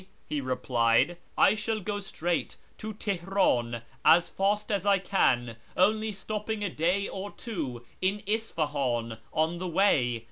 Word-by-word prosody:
" -, -, -36 dB
he 150 Hz, -2 st, -2 dB
replied; 125 Hz, +3 st, +2 dB
" -, -, -36 dB
I 195 Hz, -, +6 dB
shall 220 Hz, +1 st, -2 dB
go 205 Hz, +1 st, -3 dB
straight 175 Hz, -3 st, -2 dB, 0.2 s
to 215 Hz, -1 st, -6 dB
Teheran 175 Hz, -, 0 dB, 0.2 s
as 170 Hz, +2 st, +6 dB
fast 205 Hz, +2 st, 0 dB
as 200 Hz, -3 st, 0 dB
I 200 Hz, -1 st, +4 dB
can, 120 Hz, -, +1 dB, 0.2 s
only 215 Hz, +4 st, +3 dB
stopping 210 Hz, +2 st, -4 dB
a 200 Hz, -, -1 dB
day 180 Hz, +6 st, +1 dB
or 195 Hz, +1 st, -5 dB
two 145 Hz, -, -5 dB, 0.2 s
in 195 Hz, +2 st, 0 dB
Isfahan 145 Hz, -, -1 dB
on 160 Hz, +2 st, 0 dB
the 185 Hz, -, -3 dB
way. 155 Hz, -, +2 dB
185 Hz, 150 wpm, -28 LUFS, 130-205 Hz, 0.2 s, I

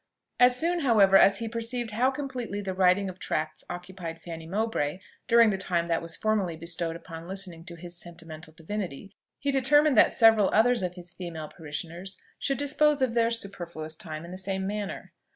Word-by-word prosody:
As 250 Hz, 0 st, +6 dB
soon, 345 Hz, +2 st, +1 dB
however, 215 Hz, -9 st, +5 dB
as 195 Hz, 0 st, +7 dB
he 230 Hz, -, -4 dB
perceived 230 Hz, +1 st, -3 dB
how 245 Hz, +5 st, +2 dB
completely 265 Hz, -6 st, -4 dB
the 195 Hz, -2 st, -3 dB
writing 185 Hz, +1 st, +3 dB
of 185 Hz, 0 st, -8 dB
tracts 155 Hz, 0 st, -3 dB
occupied 175 Hz, -2 st, -7 dB
Fanny 165 Hz, -2 st, -8 dB
Mowbray 190 Hz, -6 st, -1 dB, 0.3 s
during 230 Hz, -2 st, +6 dB
the 190 Hz, -, -2 dB
time 175 Hz, -3 st, 0 dB
that 165 Hz, -1 st, 0 dB
was 165 Hz, 0 st, -1 dB
formerly 205 Hz, -6 st, 0 dB
bestowed 170 Hz, 0 st, -3 dB
upon 165 Hz, 0 st, -9 dB
listening 185 Hz, -3 st, -6 dB
to 175 Hz, -2 st, -8 dB
his 170 Hz, +1 st, -9 dB
sentimental 165 Hz, -2 st, -10 dB
divinity, 180 Hz, +1 st, -6 dB, 0.3 s
he 280 Hz, -, -1 dB
determined 280 Hz, +2 st, +4 dB
that -, -, +7 dB
several 225 Hz, -4 st, +5 dB
others 235 Hz, +1 st, +4 dB
of 180 Hz, -1 st, -3 dB
his 175 Hz, -1 st, -4 dB
female 170 Hz, -4 st, -7 dB
parishioners 170 Hz, +4 st, -7 dB, 0.2 s
should 275 Hz, -, -1 dB
dispose 290 Hz, 0 st, +2 dB
of 250 Hz, -3 st, +1 dB
their 230 Hz, -1 st, +3 dB
superfluous 170 Hz, -8 st, -2 dB
time 155 Hz, -1 st, -7 dB
in 170 Hz, -, -10 dB
the 185 Hz, -, -7 dB
same 190 Hz, 0 st, -2 dB
manner. 205 Hz, 0 st, -5 dB
190 Hz, 185 wpm, -27 LUFS, 170-230 Hz, 0.3 s, as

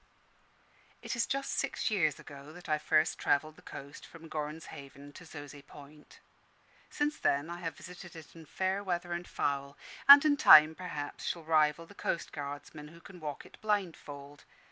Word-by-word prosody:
It -, -, -3 dB
is 235 Hz, -, 0 dB
just 275 Hz, 0 st, -2 dB
six 250 Hz, -, -1 dB
years 155 Hz, -8 st, +1 dB
ago 140 Hz, +1 st, -11 dB
that 180 Hz, +1 st, -12 dB
I 155 Hz, -1 st, +1 dB
first 155 Hz, +1 st, +2 dB
travelled 155 Hz, +2 st, +1 dB
the -, -, -17 dB
coast 140 Hz, +1 st, -10 dB
from 165 Hz, -1 st, -13 dB
Gorrans 155 Hz, +1 st, -4 dB
Haven 140 Hz, +1 st, -11 dB
to 180 Hz, -, -12 dB
Zoze 145 Hz, -2 st, -10 dB
Point. 150 Hz, +1 st, -15 dB, 0.7 s
Since 295 Hz, +1 st, -2 dB
then 145 Hz, +4 st, +1 dB
I 175 Hz, -, -6 dB
have 165 Hz, -3 st, -5 dB
visited 180 Hz, -1 st, -11 dB
it 160 Hz, 0 st, -12 dB
in 165 Hz, -2 st, -13 dB
fair 190 Hz, +4 st, -1 dB
weather 175 Hz, -2 st, -2 dB
and 175 Hz, 0 st, -5 dB
foul; 140 Hz, 0 st, -2 dB, 0.3 s
and 280 Hz, +1 st, +12 dB
in 290 Hz, -1 st, +4 dB
time, 155 Hz, -, +9 dB
perhaps, 155 Hz, -5 st, -6 dB
shall 170 Hz, -, -3 dB
rival 155 Hz, 0 st, +2 dB
the 185 Hz, -, -15 dB
coastguardsmen, 150 Hz, -4 st, -5 dB
who 165 Hz, +1 st, -15 dB
can 180 Hz, +1 st, -13 dB
walk 150 Hz, -3 st, -6 dB
it -, -, -17 dB
blindfold. 160 Hz, -9 st, -3 dB
155 Hz, 170 wpm, -31 LUFS, 145-180 Hz, 0.7 s, and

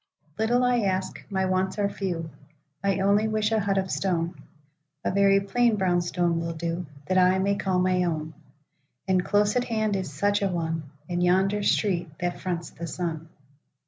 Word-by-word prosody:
'LITTLE 240 Hz, +3 st, +2 dB
I 250 Hz, -1 st, +3 dB
ask; 190 Hz, -3 st, -1 dB
my 190 Hz, -1 st, 0 dB
wants 185 Hz, +1 st, 0 dB
are 205 Hz, -1 st, +2 dB
few;I 165 Hz, -1 st, -4 dB
only 200 Hz, +2 st, +3 dB
wish 215 Hz, 0 st, 0 dB
a 220 Hz, -, +3 dB
hut 200 Hz, -1 st, 0 dB
of 190 Hz, -, +1 dB
stone(A 155 Hz, -4 st, -4 dB
very 195 Hz, 0 st, +5 dB
plain 230 Hz, +3 st, +2 dB
brown 180 Hz, -3 st, +2 dB
stone 175 Hz, -1 st, 0 dB
will 165 Hz, 0 st, -3 dB
do)That 165 Hz, 0 st, -2 dB
I 185 Hz, +1 st, +4 dB
may 200 Hz, +1 st, +1 dB
call 190 Hz, -2 st, 0 dB
my 180 Hz, 0 st, +2 dB
own;—And 155 Hz, +1 st, -4 dB
close 205 Hz, +2 st, +2 dB
at 250 Hz, 0 st, +1 dB
hand 215 Hz, -3 st, 0 dB
is 185 Hz, -6 st, -3 dB
such 205 Hz, +8 st, +1 dB
a 200 Hz, -, +2 dB
one, 165 Hz, -4 st, -3 dB, 0.2 s
In 175 Hz, 0 st, -1 dB
yonder 190 Hz, +3 st, +2 dB
street 180 Hz, -4 st, +1 dB
that 175 Hz, 0 st, -2 dB
fronts 170 Hz, -3 st, -3 dB
the 170 Hz, +1 st, -7 dB
sun. 165 Hz, -1 st, -4 dB
185 Hz, 165 wpm, -26 LUFS, 165-200 Hz, 0.2 s, very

